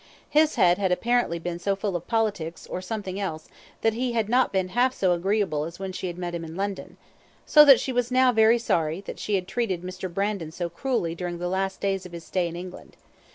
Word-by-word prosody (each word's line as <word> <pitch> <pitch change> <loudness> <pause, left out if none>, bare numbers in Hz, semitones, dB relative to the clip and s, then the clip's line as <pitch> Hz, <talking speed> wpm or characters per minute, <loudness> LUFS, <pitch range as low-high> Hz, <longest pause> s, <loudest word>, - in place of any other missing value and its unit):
His 305 +1 +4
head 180 0 +4
had 190 -2 +1
apparently 235 -2 +1
been 170 +1 -5
so 195 +2 0
full 195 -1 -3
of 175 - -4
politics, 205 -8 -1
or 180 - -5
something 195 -1 -4
else, 160 -6 -4 0.3
that 225 - +2
he 245 +1 -2
had 225 -2 0
not 250 +2 +3
been 190 -2 0
half 250 +6 +2
so 185 -2 +2
agreeable 175 -3 0
as 165 +2 -7
when 190 -1 -5
she 185 0 -4
had 175 -1 -6
met 175 -1 -4
him 170 -1 -4
in 160 0 -8
London, 200 +1 -4 0.5
so 300 - +8
that 275 -4 +8
she 265 - -2
was 245 -1 0
now 255 0 +4
very 225 0 +5
sorry 165 -6 0
that - - -8
she 210 - -1
had 185 -2 -2
treated 195 -8 -2
Mr. 185 0 -6
Brandon 195 -3 -2
so 170 +1 -4
cruelly 175 -4 -1
during 175 0 -4
the 175 +1 -3
last 190 +1 -2
days 195 -1 -1
of 175 - -17
his 170 -1 -7
stay 180 -1 -1
in 170 - -7
England. 180 +1 -9
190 Hz, 235 wpm, -25 LUFS, 175-225 Hz, 0.5 s, so